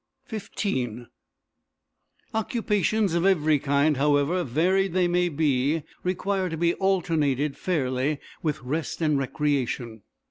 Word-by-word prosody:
XV 130 - -3 1.3
Occupations 215 -3 0
of 170 0 +1
every 155 -6 +3
kind, 145 +1 +2
however 145 +5 +2
varied 180 +8 +1
they 180 -1 +3
may 175 0 +2
be, 145 0 +1 0.2
require 185 +1 -1
to 160 - -4
be 170 +1 +2
alternated, 155 -8 +1
fairly, 140 -4 -1 0.2
with 155 -4 -2
rest 150 +6 -3
and 150 -3 +2
recreation. 130 -5 -2
155 Hz, 110 wpm, -26 LUFS, 140-185 Hz, 1.3 s, every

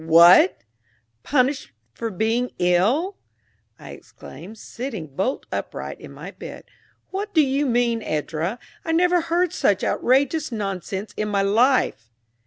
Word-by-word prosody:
"What! 170 - +6 0.6
Punished 265 - 0 0.2
for 230 - -4
being 225 +5 0
ill!" 215 - +1 0.6
I 75 - -11
exclaimed, 165 - -12
sitting 215 - -7
bolt 250 - -1
upright - - -5
in - - -10
my - - -9
bed. - - -10 0.5
"What 410 +1 -4
do 315 - +7
you 275 +2 0
mean, 235 -2 +1
Edra? 160 +5 -2 0.3
I 325 - -1
never 355 +1 +3
heard 340 +1 0
such 200 -1 +1
outrageous 280 +4 +1
nonsense 195 -1 -4
in 215 0 -1
my 200 -1 +1
life!" 220 - +2
230 Hz, 130 wpm, -23 LUFS, 185-285 Hz, 0.6 s, do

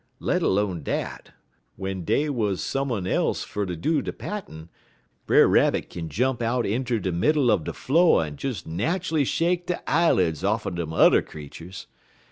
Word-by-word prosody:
Let - - 0
'lone 95 -4 0
dat, - - -4 0.5
w'en 95 -1 -4
dey 145 - +1
wuz 110 -9 0
some 135 +5 -2
un 100 -6 -2
else 95 - 0
fer 105 -1 -4
ter 90 - -3
do 150 - 0
de - - -4
pattin', 85 - -7 0.6
Brer - - +6
Rabbit - - +2
kin 80 -2 -6
jump 125 - 0
out 120 +1 0
inter 120 +3 -1
de 95 -3 -2
middle 130 - +2
er - - +3
de 80 - -5
flo' 165 - +3
en 75 -2 -5
des 130 - -4
nat'ally 155 - -1
shake 175 +5 0
de 180 - -1
eyel'ds 95 - +2
off'en 105 -1 0
dem 85 -2 -4
yuther 80 - +5
creeturs. 80 +5 -10
105 Hz, 170 wpm, -25 LUFS, 85-140 Hz, 0.6 s, Brer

